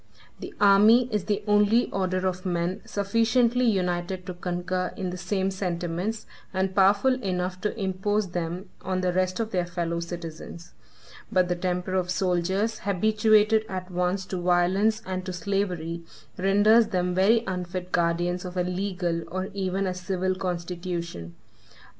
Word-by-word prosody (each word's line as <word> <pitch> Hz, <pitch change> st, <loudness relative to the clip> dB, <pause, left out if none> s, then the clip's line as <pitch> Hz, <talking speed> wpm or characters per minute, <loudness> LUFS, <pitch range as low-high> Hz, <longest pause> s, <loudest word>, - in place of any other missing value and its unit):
The -, -, -7 dB
army 210 Hz, +5 st, +6 dB
is 205 Hz, -3 st, 0 dB
the 205 Hz, 0 st, -1 dB
only 210 Hz, +3 st, +4 dB
order 185 Hz, -1 st, -1 dB
of 185 Hz, 0 st, -3 dB
men 180 Hz, +2 st, -1 dB
sufficiently 230 Hz, +4 st, +2 dB
united 180 Hz, -3 st, 0 dB
to 185 Hz, -, -5 dB
concur 180 Hz, +1 st, -2 dB
in 185 Hz, -2 st, -3 dB
the 180 Hz, -, -5 dB
same 190 Hz, +1 st, -1 dB
sentiments, 180 Hz, +3 st, -3 dB, 0.3 s
and 190 Hz, 0 st, -1 dB
powerful 200 Hz, +6 st, +4 dB
enough 185 Hz, -2 st, -2 dB
to 210 Hz, +2 st, -2 dB
impose 195 Hz, +1 st, 0 dB
them 175 Hz, +2 st, -4 dB
on 185 Hz, 0 st, -2 dB
the 180 Hz, -1 st, 0 dB
rest 185 Hz, +1 st, 0 dB
of 225 Hz, -1 st, -2 dB
their 180 Hz, -2 st, 0 dB
fellow 170 Hz, -1 st, -2 dB
citizens; 170 Hz, 0 st, -8 dB, 0.6 s
but 185 Hz, -1 st, +2 dB
the 175 Hz, -, +1 dB
temper 180 Hz, +1 st, -2 dB
of 185 Hz, -1 st, 0 dB
soldiers, 190 Hz, +4 st, 0 dB
habituated 215 Hz, +2 st, +3 dB
at 185 Hz, -1 st, -5 dB
once 180 Hz, +2 st, 0 dB
to 185 Hz, -, -4 dB
violence 185 Hz, +5 st, +2 dB
and 185 Hz, 0 st, -3 dB
to 185 Hz, -, -3 dB
slavery, 175 Hz, -3 st, -2 dB, 0.3 s
renders 205 Hz, +4 st, +4 dB
them 180 Hz, -3 st, 0 dB
very 210 Hz, +5 st, +4 dB
unfit 180 Hz, -1 st, -4 dB
guardians 175 Hz, +1 st, 0 dB
of 180 Hz, 0 st, -7 dB
a 180 Hz, -, +2 dB
legal, 180 Hz, -2 st, -2 dB
or 185 Hz, +2 st, -3 dB
even 195 Hz, 0 st, -1 dB
a 185 Hz, -, -1 dB
civil 185 Hz, +1 st, -1 dB
constitution. 170 Hz, -, -4 dB
185 Hz, 150 wpm, -26 LUFS, 180-200 Hz, 0.6 s, army